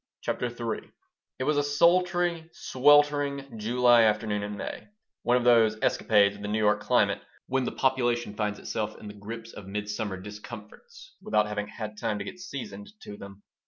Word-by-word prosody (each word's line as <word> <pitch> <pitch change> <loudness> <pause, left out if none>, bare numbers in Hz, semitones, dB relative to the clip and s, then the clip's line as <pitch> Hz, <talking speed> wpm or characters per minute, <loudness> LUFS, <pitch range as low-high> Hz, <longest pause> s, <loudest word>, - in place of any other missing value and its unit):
CHAPTER 125 - -2
III 120 -2 -5 0.5
IT 130 - -2
was 150 +2 +1
a 145 - +3
sultry, 170 +2 +2
sweltering 140 -2 +2
July 120 +2 +4
afternoon 105 -1 +1
in 105 0 -5
May, - - -6 0.3
one 120 +1 +3
of 125 - -1
those 115 -3 +5
escapades 100 -2 +3
of 100 - -12
the 105 - -4
New 105 +1 0
York 105 -1 +3
climate - - +2 0.2
when 130 0 0
the - - -2
population 120 -4 0
finds 105 -1 -2
itself 110 -1 -4
in 105 - -10
the 105 - -7
grip 110 +3 -8
of 100 - -10
midsummer 105 0 -3
discomforts 465 - -11
without 105 - +2
having 105 0 -3
had 105 0 -7
time 110 -3 -1
to - - -5
get 180 - -8
seasoned 205 +3 -7
to 105 - -8
them. 100 0 -12
115 Hz, 175 wpm, -27 LUFS, 105-145 Hz, 0.5 s, those